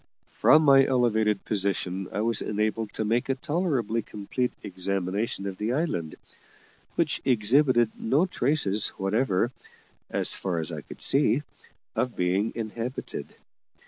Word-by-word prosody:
From 155 +1 +6
my 135 -2 +7
elevated 110 -6 +1
position 95 -2 -1
I 105 - -2
was 115 0 0
enabled 110 +1 -1
to 110 - -1
make 115 +5 0
a 135 - +2
tolerably 135 - -1
complete 105 +5 -3
examination 100 +3 -2
of 95 -1 -4
the 110 +3 -1
island, 125 - -2 0.8
which 160 -5 0
exhibited 120 0 +3
no 140 +10 +2
traces 130 - +1
whatever, 105 +2 +1 0.6
as - - +2
far 90 -3 -2
as 80 -1 -3
I - - -5
could - - -11
see, 140 -1 +3 0.5
of 125 -2 -1
being 95 +5 +1
inhabited. 115 +3 -5
110 Hz, 130 wpm, -27 LUFS, 100-130 Hz, 0.8 s, my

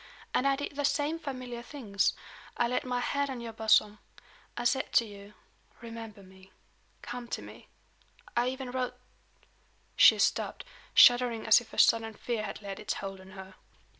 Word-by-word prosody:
And 275 - +2
I 275 - +3
did 285 +1 -6
the 290 - -2
same 290 +3 0
familiar 255 -5 -6
things. 230 -6 -1 0.4
I 240 - +2
laid 250 +2 -1
my 250 -1 -1
hand 280 +2 -1
on 260 -2 -5
your 230 -1 -7
bosom. 215 -1 +3 0.6
I 240 - -2
said 265 +2 0
to 235 - +4
you: 205 -1 -12 0.4
'Remember 225 -3 -9
me. 190 0 -18 0.5
Come 245 0 -7
to - - -4
me.' - - -13 0.7
I 240 +1 +2
even 260 0 -4
wrote 250 -1 -3 0.5
" - - -38
She - - +7
stopped, - - 0 0.3
shuddering 245 -2 +6
as 220 +2 +6
if 235 - -16
a - - -11
sudden 225 -1 +4
fear 235 -1 -3
had 215 0 -7
laid 195 -1 -6
its 210 - -3
hold 195 -1 -7
on 190 0 -14
her. 190 0 -10
235 Hz, 175 wpm, -30 LUFS, 210-255 Hz, 0.7 s, She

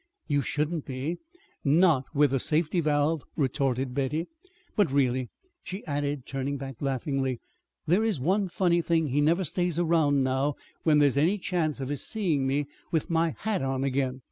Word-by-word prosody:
"You 145 -2 +2
shouldn't 150 +4 -1
be 135 +6 -3 0.5
not 150 -2 +4
with 145 -2 +3
a 135 - +2
safety 160 +5 +1
valve," 150 0 +1
retorted 135 -3 0
Betty. 145 +5 -1 0.5
"But, 205 -9 +3
really," 130 -2 +1 0.3
she 190 +3 -7
added, 145 -2 -2
turning 135 +1 -3
back 135 -2 -7
laughingly, 135 -2 -1 0.5
"there 185 +7 +3
is 215 -9 0
one 190 +8 +1
funny 175 -1 +2
thing: 165 -2 +1
he 140 +3 +2
never 170 +5 +3
stays 175 0 -1
around 160 -5 +3
now 130 +2 0 0.3
when 155 -2 +4
there's 145 -2 +4
any 170 +8 +3
chance 170 -6 -1
of 135 -1 -4
his 145 -2 -2
seeing 165 -11 0
me 140 +2 +1 0.3
with 160 0 0
my 165 -1 +1
hat 215 -2 -1
on 135 0 -1
again. 130 -1 -1
145 Hz, 170 wpm, -27 LUFS, 135-165 Hz, 0.5 s, not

